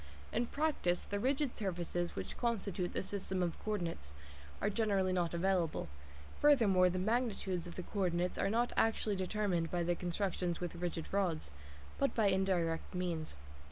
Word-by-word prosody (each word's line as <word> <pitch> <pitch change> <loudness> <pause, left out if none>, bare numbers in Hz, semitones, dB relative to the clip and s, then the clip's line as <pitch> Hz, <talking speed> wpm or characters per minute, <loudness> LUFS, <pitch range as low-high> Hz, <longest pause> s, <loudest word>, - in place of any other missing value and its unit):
In 240 +1 +1
practice, 285 - 0
the 205 - -3
rigid 265 +3 +1
surfaces 175 -3 -2
which - - -5
constitute 200 -7 -1
the - - -1
system 190 -1 -1
of 170 -2 -2
co 215 - 0
ordinates 165 - -4 0.5
are 205 - +1
generally 195 -4 +2
not 175 -2 0
available; 170 - +1 0.5
furthermore, 210 -11 +5
the 180 - -2
magnitudes 195 -4 0
of 175 - -8
the 180 - -4
co 200 - -5
ordinates 180 -1 +1
are - - +2
not 235 +3 +1
actually 220 -2 +2
determined 185 -3 0
by 175 -1 0
constructions 175 0 -1
with 175 -2 -3
rigid 170 -1 -4
rods, 175 - 0 0.5
but 275 - +1
by 215 -3 +4
indirect 185 -4 +1
means. 170 - -2
185 Hz, 160 wpm, -35 LUFS, 175-210 Hz, 0.5 s, furthermore